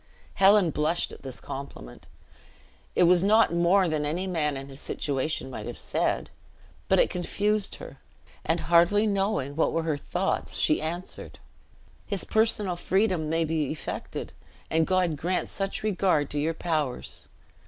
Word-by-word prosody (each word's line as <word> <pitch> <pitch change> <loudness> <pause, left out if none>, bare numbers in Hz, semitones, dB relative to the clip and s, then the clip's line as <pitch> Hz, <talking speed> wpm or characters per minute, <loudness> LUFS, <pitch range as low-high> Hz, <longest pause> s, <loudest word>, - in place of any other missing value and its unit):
Helen 195 -3 +5
blushed 155 +4 0
at - - -11
this 130 -2 -7
compliment 135 - -9 0.9
it - - +5
was 175 +1 +5
not 215 -2 +4
more 175 +3 +4
than 155 -2 -1
any 165 +6 -1
man 155 -6 0
in 135 0 -7
his 135 0 -10
situation 140 -1 -2
might - - -6
have - - -6
said, - - -1 0.6
but - - +4
it - - +3
confused 205 +3 0
her; 135 - -11 0.4
and 165 +1 0
hardly 175 +5 +4
knowing 195 -9 0
what 160 - +2
were 165 - 0
her 155 -3 -1
thoughts, 180 +6 -2
she 155 - +2
answered 170 +4 -5 0.7
"His 200 -3 -1
personal 215 -4 +1
freedom 185 -3 +1
may 165 +1 +1
be 155 -3 -1
effected, 155 - -5 0.4
and 160 0 +2
God 180 -4 +1
grant 180 +5 -1
such 195 +1 -3
a - - 0
regard 180 -7 +1
to 145 - -1
your 160 +3 0
prowess! 155 -7 -3
170 Hz, 155 wpm, -27 LUFS, 150-190 Hz, 0.9 s, Helen